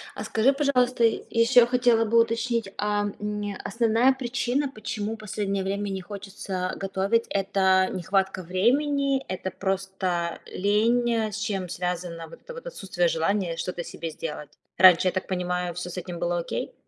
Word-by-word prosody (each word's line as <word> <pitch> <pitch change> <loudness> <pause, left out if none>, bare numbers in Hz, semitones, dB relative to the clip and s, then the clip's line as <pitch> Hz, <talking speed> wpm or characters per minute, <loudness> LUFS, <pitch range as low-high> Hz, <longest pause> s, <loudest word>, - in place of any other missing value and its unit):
А, - - -5
скажи, 240 +5 +2
пожалуйста, 255 -4 +2
и, 225 - +3 0.2
еще, 235 +1 +6
хотела 240 -2 +3
бы 230 +2 +4
уточнить, 230 -2 -1
а, 205 0 0
м, 210 -1 -3
основная 230 +4 +3
причина, 260 +2 -1
почему 215 -2 -4
последнее 200 -2 -2
время 200 +1 -2
не 190 -1 -3
хочется, 195 -1 -5
а, - - -4
готовить: 195 +4 0
это 190 -1 +2
нехватка 190 +1 -1
времени, 275 - +1
это, 190 0 -3
просто, 190 -3 -2
лень, 225 +2 +1
с 220 - -5
чем 200 -4 -2
связано 175 -1 -4
вот - - -14
это - - -9
вот 485 +1 -9
отсутствие 185 - -1
желания 170 +1 0
что-то 175 0 -3
себе 165 0 -6
сделать? 150 -2 -6 0.3
Раньше, 185 -1 +7
я - - +3
так 185 +1 -3
понимаю, 180 -1 -2
всё 180 +1 -5
с 180 - -8
этим 175 -1 -5
было 175 0 0
окей. 170 - -4
200 Hz, 160 wpm, -26 LUFS, 185-230 Hz, 0.3 s, Раньше